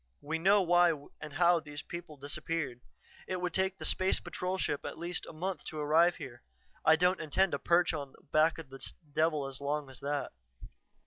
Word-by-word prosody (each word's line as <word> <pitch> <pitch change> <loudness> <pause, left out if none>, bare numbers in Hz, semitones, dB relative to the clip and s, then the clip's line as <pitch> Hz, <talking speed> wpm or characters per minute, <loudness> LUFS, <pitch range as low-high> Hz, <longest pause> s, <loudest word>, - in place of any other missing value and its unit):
We 160 +3 -2
know 195 +3 +5
why 175 -1 +5 0.3
and 150 -1 -7
how 175 +2 +4
those 150 -2 -8
people 170 -3 -8
disappeared. 145 -2 -3 0.5
It 185 -1 -2
would 180 -1 -2
take 190 0 +1
the - - -6
Space 185 0 +2
Patrol 185 +1 -3
ship 145 - -1
at - - -6
least 170 +1 -3
a - - -7
month 170 +1 -4
to 155 - -6
arrive 160 +4 +4
here; 120 -1 -9 0.4
I 160 - +7
don't 180 +3 +2
intend 170 +5 +2
to 140 - -1
perch 175 +2 +3
on 140 -3 -5
the - - -21
back 155 +1 +4
of 160 -5 -9
this 135 -1 -6 0.2
devil 155 -2 +2
as 135 0 -7
long 145 -1 -2
as 130 - -9
that. 145 0 -2
160 Hz, 200 wpm, -32 LUFS, 145-175 Hz, 0.5 s, I